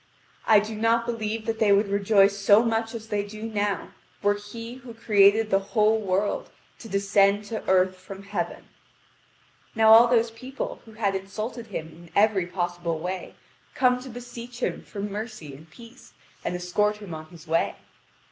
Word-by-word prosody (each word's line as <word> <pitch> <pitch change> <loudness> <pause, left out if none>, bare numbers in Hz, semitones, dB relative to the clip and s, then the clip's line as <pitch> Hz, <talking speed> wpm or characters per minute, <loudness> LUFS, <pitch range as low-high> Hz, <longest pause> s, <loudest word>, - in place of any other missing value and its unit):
I 215 -2 +7
do 215 +2 -5
not 230 +2 +1
believe 225 -2 -3
that 225 -1 -2
they 215 -2 +4
would 200 +1 +4
rejoice 200 0 +4
so 205 +2 +5
much 225 0 -1
as 225 -1 -8
they 205 -1 0
do 215 +2 -9
now 205 -2 -2 0.3
were 205 0 +4
He 230 +4 -8
who 240 -2 -11
created 210 0 +4
the 195 - +4
whole 215 +2 +2
world 200 0 -1 0.3
to 225 - -10
descend 200 +1 +2
to 220 +1 -5
earth 185 0 +3
from 190 +1 -10
Heaven. 200 +1 -4 1.1
Now 220 0 +7
all 230 +2 +9
those 235 -1 +2
people 255 +4 -6
who 220 - -14
had 210 -2 0
insulted 215 +5 -5
him 160 -6 -5
in 170 +1 -15
every 200 -4 +3
possible 175 -2 -2
way 180 +3 -5 0.4
come 250 -1 +3
to 260 - -9
beseech 245 0 -9
him - - -2
for 200 - -8
mercy 205 - -6
and 155 +4 -14
peace, 235 +7 -15 0.3
and - - -2
escort 210 +4 0
him 205 -5 -9
on 155 0 -8
his 170 -2 -14
way. 165 +1 0
210 Hz, 175 wpm, -25 LUFS, 195-225 Hz, 1.1 s, all